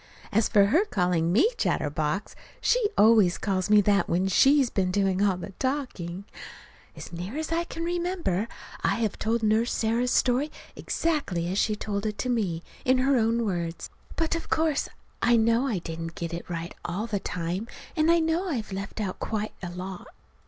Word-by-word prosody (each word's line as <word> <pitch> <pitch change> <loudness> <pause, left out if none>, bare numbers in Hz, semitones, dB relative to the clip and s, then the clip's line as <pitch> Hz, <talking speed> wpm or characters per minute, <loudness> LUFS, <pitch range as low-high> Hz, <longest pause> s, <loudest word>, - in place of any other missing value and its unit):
As 220 +1 +3
for 200 -1 +5
her 310 - +4
calling 180 - +1
me 320 - +4
"chatterbox" - - -1 0.2
she - - +2
always 210 -4 +5
calls 190 -2 -1
me 210 0 +7
that 200 0 +2
when 180 +3 +1
she's 270 +6 +4
been 185 -2 +1
doing 195 0 +1
all 200 -3 +3
the 185 - -7
talking. 240 -10 -3 0.7
As - - -9
near 180 - -5
as 315 +1 -3
I 335 +1 +1
can 330 - -6
remember, 345 - -1 0.4
I - - +2
have 220 -3 -2
told 225 +1 0
Nurse 220 +2 +2
Sarah's 230 +2 +1
story 260 +5 +2 0.2
exactly 280 - -1
as 195 - 0
she 215 - +2
told 205 0 -3
it 210 - -4
to 255 - -2
me, 190 -9 0 0.2
in 255 +1 +3
her 270 +2 +3
own 230 0 +2
words. 170 -4 -3 0.2
But 325 0 0
of 330 - -5
course 315 -2 +1 0.3
I 235 0 +4
know 230 +4 +3
I 225 -7 0
didn't 165 -1 -6
get 170 0 -4
it 170 - -6
right 170 0 -4
all 175 +5 -3
the 210 -3 -2
time, 180 +4 -3 0.3
and 310 0 +3
I 340 - +6
know 330 +3 0
I've 230 -10 -3
left 195 +2 -5
out 195 -4 -3
quite 215 -1 -3
a 175 - -4
lot. 180 +1 -7
215 Hz, 185 wpm, -27 LUFS, 185-260 Hz, 0.7 s, me